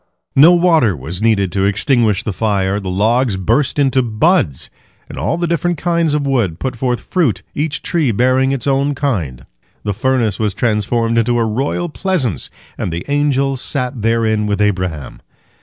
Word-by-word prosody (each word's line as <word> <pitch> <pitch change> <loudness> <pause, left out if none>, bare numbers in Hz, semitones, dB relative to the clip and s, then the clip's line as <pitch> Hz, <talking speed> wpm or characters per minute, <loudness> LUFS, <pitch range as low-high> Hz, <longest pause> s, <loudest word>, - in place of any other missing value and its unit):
" - - -54
No 175 - +7
water 165 - +3
was 80 +8 -6
needed 105 -5 +2
to 95 -1 0
extinguish 110 0 +1
the 110 - -3
fire. 100 -2 0
The 95 -2 -5
logs 110 +3 +1
burst 115 +11 0
into 135 -2 +2
buds, 115 - 0 0.4
and - - -9
all 165 - -1
the 175 - -1
different 170 +1 -1
kinds 170 -2 0
of 145 -1 -1
wood 120 -12 0
put 130 +3 -4
forth 125 0 -1
fruit, 120 - -1
each 150 0 -3
tree 160 -8 0
bearing 130 +4 +2
its 135 -4 -3
own 140 +1 +1
kind. 85 - -3 0.4
The 105 - -1
furnace 120 -3 0
was 105 -3 -1
transformed 115 +1 0
into 120 +1 +1
a 115 - +1
royal 135 +10 -2
pleasance, 155 - -1 0.3
and 90 - -2
the 85 +2 -5
angels 140 -2 +1
sat 125 -4 -2
therein 110 -1 +1
with 100 0 -1
Abraham. 90 -9 -2
120 Hz, 175 wpm, -16 LUFS, 100-140 Hz, 0.4 s, No